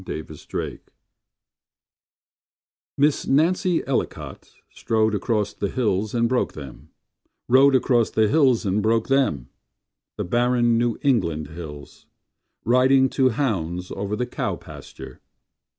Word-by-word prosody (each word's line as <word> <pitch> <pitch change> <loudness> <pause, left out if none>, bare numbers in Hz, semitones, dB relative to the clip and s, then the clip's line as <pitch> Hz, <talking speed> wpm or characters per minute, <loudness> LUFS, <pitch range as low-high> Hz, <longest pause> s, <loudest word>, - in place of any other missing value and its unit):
Cousin 80 -3 -6 0.2
Nancy - - -5 2.2
Miss 145 +1 +1
Nancy 170 +5 +2
Ellicot 135 -1 -4 0.2
Strode 110 -1 0
across 105 0 -1
the 100 - -3
hills 110 -3 -1
and 115 0 +2
broke 125 +1 0
them 70 -4 -11 0.6
Rode 135 +2 +5
across 120 -3 +2
the 110 -1 +2
hills 130 -5 +3
and 100 +2 0
broke 110 +2 +1
them— 130 - +1 0.7
The - - -2
barren 120 +2 +2
New 120 -1 0
England 85 - 0
hills 75 -3 -10 0.6
Riding 130 +2 +4
to 130 -1 +2
hounds 90 - -2
Over 100 +1 -3
the 125 - -2
cow 125 - -3
pasture. - - -12
115 Hz, 120 wpm, -23 LUFS, 100-130 Hz, 2.2 s, Rode